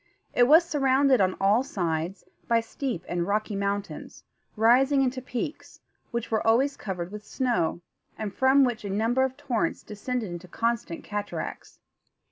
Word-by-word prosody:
It 245 Hz, 0 st, +5 dB
was 320 Hz, +5 st, +7 dB
surrounded, 270 Hz, -, +3 dB
on 185 Hz, -1 st, +2 dB
all 200 Hz, +5 st, +4 dB
sides, 175 Hz, -, -3 dB, 0.2 s
by 230 Hz, -1 st, +4 dB
steep 230 Hz, -, -4 dB
and 175 Hz, 0 st, -2 dB
rocky 210 Hz, 0 st, -1 dB
mountains, 200 Hz, 0 st, -4 dB, 0.3 s
rising 260 Hz, +5 st, +4 dB
into 255 Hz, 0 st, -1 dB
peaks, 250 Hz, +4 st, -6 dB, 0.3 s
which 235 Hz, -1 st, -4 dB
were 220 Hz, -, +2 dB
always 260 Hz, +5 st, +3 dB
covered 180 Hz, -3 st, -5 dB
with 210 Hz, 0 st, -8 dB
snow, 235 Hz, -9 st, -1 dB, 0.4 s
and 210 Hz, -3 st, -4 dB
from 265 Hz, +3 st, +4 dB
which 240 Hz, -4 st, -1 dB
a 200 Hz, -, -4 dB
number 225 Hz, +6 st, +1 dB
of 260 Hz, 0 st, -2 dB
torrents 275 Hz, -6 st, -1 dB
descended 215 Hz, 0 st, -4 dB
in 180 Hz, -, -14 dB
constant 230 Hz, -5 st, -2 dB
cataracts. 205 Hz, 0 st, -5 dB
230 Hz, 150 wpm, -27 LUFS, 200-260 Hz, 0.4 s, was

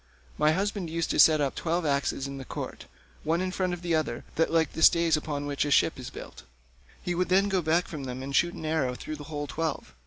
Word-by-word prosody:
My 155 Hz, +1 st, +3 dB
husband 195 Hz, -1 st, -2 dB
used 165 Hz, 0 st, -1 dB
to -, -, 0 dB
set 155 Hz, -2 st, +7 dB
up 140 Hz, -2 st, 0 dB
twelve 170 Hz, +1 st, -1 dB
axes 140 Hz, -1 st, 0 dB
in 140 Hz, 0 st, -6 dB
the -, -, -6 dB
court, -, -, -7 dB, 0.4 s
one 165 Hz, +2 st, +1 dB
in 185 Hz, 0 st, -1 dB
front 185 Hz, -1 st, -1 dB
of 175 Hz, 0 st, -5 dB
the 170 Hz, -1 st, 0 dB
other, 155 Hz, -7 st, -1 dB
like 165 Hz, -1 st, +2 dB
the 160 Hz, -, -5 dB
stays 170 Hz, -1 st, +5 dB
upon 150 Hz, -2 st, -3 dB
which 145 Hz, -1 st, -1 dB
a 145 Hz, -, -2 dB
ship 145 Hz, +1 st, +3 dB
is 125 Hz, -, -6 dB
built; -, -, -10 dB, 0.6 s
he 175 Hz, -, -1 dB
would 180 Hz, +1 st, 0 dB
then 195 Hz, +2 st, +3 dB
go 190 Hz, -2 st, +1 dB
back 165 Hz, +2 st, +1 dB
from 145 Hz, -4 st, -6 dB
them 130 Hz, 0 st, -5 dB
and 140 Hz, +1 st, -4 dB
shoot 175 Hz, 0 st, +2 dB
an 160 Hz, -, -7 dB
arrow 150 Hz, -5 st, 0 dB
through 155 Hz, +4 st, -6 dB
the 145 Hz, -, -9 dB
whole 145 Hz, -1 st, -4 dB
twelve. 155 Hz, -, -4 dB
160 Hz, 245 wpm, -28 LUFS, 145-170 Hz, 0.6 s, set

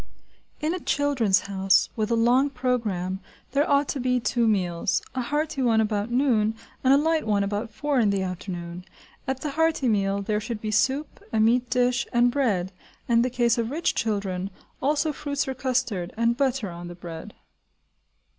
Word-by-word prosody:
In 310 Hz, +3 st, 0 dB
a 365 Hz, -, -3 dB
"Children's 270 Hz, -, +2 dB
House" 195 Hz, -1 st, +2 dB
with 215 Hz, -1 st, -1 dB
a 235 Hz, -, +2 dB
long 245 Hz, +5 st, +3 dB
programme 225 Hz, -8 st, -1 dB, 0.3 s
there 280 Hz, +3 st, +1 dB
ought 285 Hz, 0 st, +3 dB
to 280 Hz, -, -2 dB
be 250 Hz, 0 st, +1 dB
two 235 Hz, 0 st, +1 dB
meals, 180 Hz, -5 st, 0 dB
a 260 Hz, -, -1 dB
hearty 295 Hz, +2 st, -1 dB
one 230 Hz, -3 st, +3 dB
about 210 Hz, 0 st, 0 dB
noon, 240 Hz, -4 st, +2 dB, 0.3 s
and 260 Hz, -, +4 dB
a 275 Hz, -, +7 dB
light 315 Hz, -2 st, +1 dB
one 205 Hz, -2 st, +2 dB
about 205 Hz, +3 st, -2 dB
four 285 Hz, +5 st, -1 dB
in 215 Hz, -3 st, +3 dB
the 195 Hz, -1 st, 0 dB
afternoon. 180 Hz, -1 st, -5 dB, 0.4 s
At 265 Hz, 0 st, -2 dB
the 300 Hz, -, -3 dB
hearty 320 Hz, -2 st, +1 dB
meal, 200 Hz, -2 st, +1 dB
there 210 Hz, +1 st, 0 dB
should 225 Hz, 0 st, -4 dB
be 215 Hz, 0 st, -3 dB
soup, 265 Hz, +8 st, 0 dB
a 220 Hz, -, +1 dB
meat 240 Hz, +3 st, +3 dB
dish, 250 Hz, +1 st, +1 dB
and 240 Hz, 0 st, +4 dB
bread, 205 Hz, -10 st, 0 dB, 0.4 s
and, 235 Hz, -, +3 dB
in -, -, +5 dB
the 250 Hz, -, +1 dB
case 235 Hz, -1 st, +2 dB
of 230 Hz, -1 st, -1 dB
rich 320 Hz, +5 st, 0 dB
children, 195 Hz, -4 st, -2 dB, 0.3 s
also 295 Hz, +2 st, +1 dB
fruits 285 Hz, -1 st, -2 dB
or 265 Hz, -, -2 dB
custard, 250 Hz, -9 st, -1 dB
and 230 Hz, +1 st, +2 dB
butter 260 Hz, -6 st, 0 dB
on 170 Hz, 0 st, -8 dB
the 175 Hz, -, -8 dB
bread. 170 Hz, +3 st, -9 dB
235 Hz, 185 wpm, -25 LUFS, 200-265 Hz, 0.4 s, a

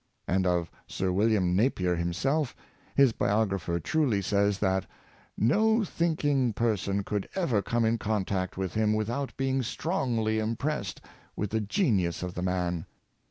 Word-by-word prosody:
And 95 Hz, 0 st, +1 dB
of 85 Hz, -1 st, 0 dB, 0.2 s
Sir 95 Hz, -1 st, -1 dB
William 95 Hz, -2 st, +2 dB
Napier 95 Hz, -5 st, +2 dB
himself, 120 Hz, -, 0 dB, 0.4 s
his 135 Hz, -3 st, +6 dB
biographer 95 Hz, -7 st, 0 dB
truly 125 Hz, -, +1 dB
says, 100 Hz, +1 st, +1 dB
that 95 Hz, -2 st, 0 dB, 0.2 s
" -, -, -31 dB
no 220 Hz, -, +3 dB
thinking 145 Hz, -, +1 dB
person 100 Hz, -3 st, 0 dB
could 105 Hz, 0 st, -3 dB
ever 140 Hz, -, +1 dB
come 115 Hz, +2 st, 0 dB
in 115 Hz, +1 st, +1 dB
contact 95 Hz, -4 st, -1 dB
with 95 Hz, -3 st, -2 dB
him, 110 Hz, 0 st, +2 dB
without 120 Hz, +6 st, -2 dB
being 135 Hz, 0 st, +1 dB
strongly 120 Hz, -, -1 dB
impressed 115 Hz, -, -2 dB, 0.3 s
with 105 Hz, -1 st, -3 dB
the 110 Hz, 0 st, +1 dB
genius 100 Hz, -, +1 dB
of 90 Hz, -1 st, -4 dB
the 90 Hz, -, -4 dB
man." 90 Hz, -2 st, -1 dB
105 Hz, 145 wpm, -28 LUFS, 95-130 Hz, 0.4 s, his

